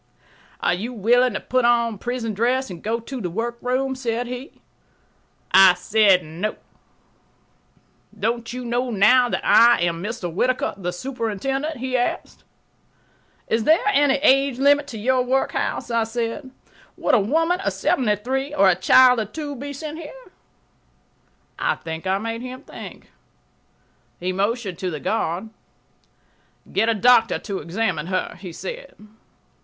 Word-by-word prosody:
"Are - - +2
you 220 +8 -4
willing 240 +2 +2
to - - -1
put 255 0 0
on 235 -3 +2
prison 240 -2 -3
dress 250 +4 0
and 170 -2 -9
go 225 +2 -2
to 250 +2 -7
the 180 - -3
workroom?" 240 +6 -2
said 245 -2 -3
he. 250 +2 -8 0.9
I 190 -2 +7
said, 195 -1 +3
"No." 170 +7 -4 1.6
"Don't 230 +2 -2
you 250 0 -6
know 245 +2 -1
now 245 +4 +4
that - - -3
I 235 +1 +6
am 170 -1 -1
Mr. 200 -4 -5
Whittaker, 255 +8 0
the 180 -3 -4
superintendent?" 270 - -3
he 255 +1 -3
asked. 245 -1 -2 1.0
"Is 225 0 0
there 320 +2 +4
any 285 -4 +4
age 275 -2 +4
limit 285 +2 +3
to 230 - -7
your 255 +4 +1
workhouse?" 255 -1 -1
I 230 -1 +1
said. 235 +4 -4 0.5
"Would - - 0
a 245 - +6
woman 325 - +1
of 390 - -1
seventy 215 -5 +1
three 265 +7 -3
or 195 -7 +5
a 180 - +3
child 250 +6 +5
of 215 -1 -4
two 295 -2 -5
be 285 +3 -7
sent 305 +3 -7
here?" 415 +11 -11 1.3
I - - +1
think 160 +2 -7
I 190 +1 +2
made 225 +2 -4
him 255 +2 -8
think. - - -11 1.1
He 185 +1 -2
motioned 200 -1 -2
to 185 - -2
the 155 -4 -5
guard. 195 +4 -2 1.2
"Get 225 +3 +2
a 230 - +2
doctor 230 +1 +4
to 200 -3 -5
examine 175 -3 -2
her," 185 0 -2
he 185 -2 -8
said. - - -8
235 Hz, 150 wpm, -22 LUFS, 200-260 Hz, 1.6 s, I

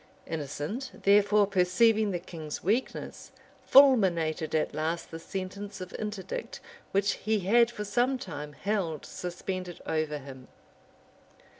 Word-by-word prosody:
Innocent, 160 - -5
therefore, 205 +1 +5
perceiving 205 +3 +3
the 185 - -1
king's 160 -3 -7
weakness, 220 +8 -2 0.4
fulminated 175 - +5
at 155 - 0
last 160 +3 -2
the 165 - -6
sentence 195 +3 -6
of 185 0 -8
interdict 210 - -5 0.3
which 200 +1 +2
he 215 -1 -1
had 230 +5 +4
for 210 -3 -6
some 245 +6 +1
time 150 - -7
held 185 -5 -2
suspended 180 0 -5
over 155 -1 -1
him. 130 -2 -11
185 Hz, 120 wpm, -29 LUFS, 160-210 Hz, 0.4 s, therefore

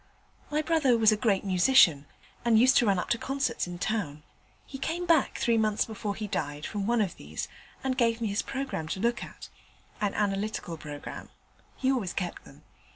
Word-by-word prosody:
My 300 +1 0
brother 305 -7 +3
was 220 -1 +5
a - - +3
great 210 -3 +1
musician, 180 - +5 0.4
and 235 -2 +4
used 255 +4 +6
to 235 - +4
run 195 -2 +3
up 180 - -3
to 235 - +2
concerts 275 -7 -1
in 175 0 -6
town. 175 -7 -2 0.4
He 270 - -9
came 340 +5 -2
back, 330 -5 +3
three 230 -1 +2
months 215 -1 +1
before 210 -2 -4
he 215 - -4
died, 150 -7 -3
from 205 -2 -3
one 235 -1 +2
of 195 -5 -2
these, 75 +2 -6 0.4
and 265 -1 0
gave 230 -2 +2
me 225 -2 -1
his 200 - 0
programme 265 - -4
to 190 - -3
look 235 +3 0
at - - -11 0.5
an 205 -2 0
analytical 200 -3 -1
programme: 150 -2 -8 0.5
he 265 0 +1
always 225 -9 -1
kept 180 -2 -4
them. - - -16
215 Hz, 195 wpm, -28 LUFS, 185-255 Hz, 0.5 s, used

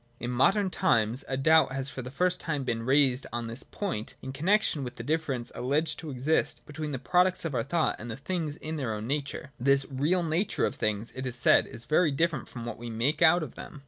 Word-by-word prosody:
In 120 - -3
modern 190 - +3
times 120 - +2
a 135 - -2
doubt 155 0 +4
has 135 0 -3
for 130 - -6
the 125 - -7
first 180 +7 0
time 145 -4 -2
been 115 -3 -2
raised 130 +1 +2
on 120 0 -3
this 115 +3 -4
point 175 - -4
in 130 - -5
connexion 165 0 +2
with 125 -1 -6
the - - -7
difference 145 -6 -2
alleged 150 +5 0
to 160 - -7
exist 140 +4 0
between 150 0 -5
the 135 - -2
products 180 +7 +2
of 160 - -2
our - - +1
thought 160 +3 0
and 120 - -7
the 110 - -5
things 155 0 -3
in 155 +1 -5
their 120 -7 -2
own 105 +1 -5
nature. 140 +1 -3
This 135 +2 +3
real 155 +7 +1
nature 165 +5 0
of - - -1
things, 110 -4 -1
it 130 0 -5
is 125 - -2
said, 125 - +4
is 115 +1 -9
very 155 +2 +3
different 150 0 0
from 120 -2 -7
what 120 -2 -6
we 120 0 -6
make 125 +8 0
out 165 +1 +6
of 140 - -7
them. 150 - -9
140 Hz, 235 wpm, -28 LUFS, 125-160 Hz, -, out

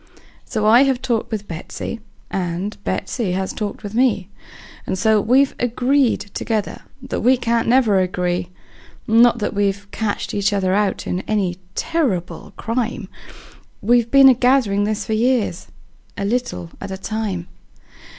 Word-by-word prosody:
So 215 -1 -2
I 230 +4 +7
have 270 -2 +2
talked 235 -3 -2
with 210 -2 -4
Betsey, 170 +7 -6 0.3
and 185 +2 -3
Betsey 215 -8 -2
has 190 0 -2
talked 210 0 -5
with 205 0 -6
me, 225 -6 +1 0.6
And 190 - -1
so 220 +1 +3
we've 265 +5 +3
agreed 250 +2 +2
together 215 -3 -2 0.2
that - - -3
we 255 +2 +4
can't 235 -1 0
never 230 -5 +4
agree; 180 -1 -1 0.6
Not 235 +1 +5
that 210 - -2
we've 200 0 0
catched 215 -2 -3
each 205 0 +1
other 190 -2 +1 0.3
in 180 - -2
any 190 -4 -1 0.2
terrible 235 - -2
crime; 230 -3 -3 0.7
We've 235 +2 +3
been 275 +1 +7
a - - +7
gathering 245 -5 +2
this 215 -1 -2
for 220 - -2
years, 220 -5 0 0.5
a 200 - -2
little 235 -6 -2
at 200 - -6
a 190 - -5
time. 195 -3 -3
215 Hz, 145 wpm, -20 LUFS, 195-245 Hz, 0.7 s, I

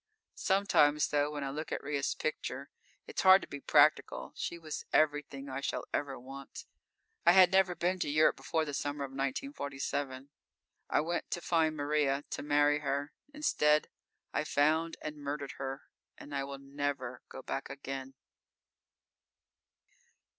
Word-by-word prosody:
Sometimes, 170 -7 +3
though, 145 0 +2
when 150 -1 -4
I 135 - -3
look 155 +3 -5
at - - -3
Ria's 145 -1 -1
picture, 140 -3 -4 0.3
it's - - -3
hard 190 0 +8
to - - -8
be 145 - -7
practical. 150 +1 +3
She 170 - -4
was 155 -2 -6
everything 145 -2 +1
I 135 0 -4
shall - - -2
ever 140 -2 -2
want. 135 +2 -9 0.6
I - - +7
had 185 -1 +7
never 190 -2 +4
been 180 +2 0
to - - -1
Europe 155 +2 +4
before 160 -1 -1
the 145 - -5
summer 145 +1 -2
of 135 - -5
1947. 135 - -3 0.6
I - - +3
went 170 +2 -2
to - - -2
find 160 -2 +1
Maria, 145 -1 +1
to - - -3
marry 145 0 +3
her. 140 0 -2 0.2
Instead, 150 - +2 0.4
I - - +1
found 160 +3 +2
and 150 0 -5
murdered 145 -1 -4
her, 135 +1 -4 0.3
and 145 - -10
I 140 -1 -1
will 140 0 -6
never 140 -2 -4
go - - -9
back - - -4
again. 135 -1 -6
145 Hz, 155 wpm, -32 LUFS, 140-155 Hz, 0.6 s, hard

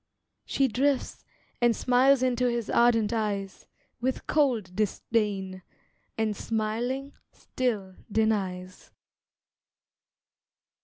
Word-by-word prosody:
She 275 - +1
drifts, 265 +3 0 0.4
and 240 -1 +4
smiles 255 +1 +4
into 250 -1 +2
his 235 -2 -2
ardent 235 -2 +3
eyes, 205 -3 -3 0.3
With 255 +2 -2
cold 235 - +1
disdain, 200 -2 -1 0.6
and 220 -1 0
smiling 235 +7 -2 0.2
still 215 -7 -3 0.2
denies. 190 -4 -1
225 Hz, 85 wpm, -27 LUFS, 205-250 Hz, 0.6 s, and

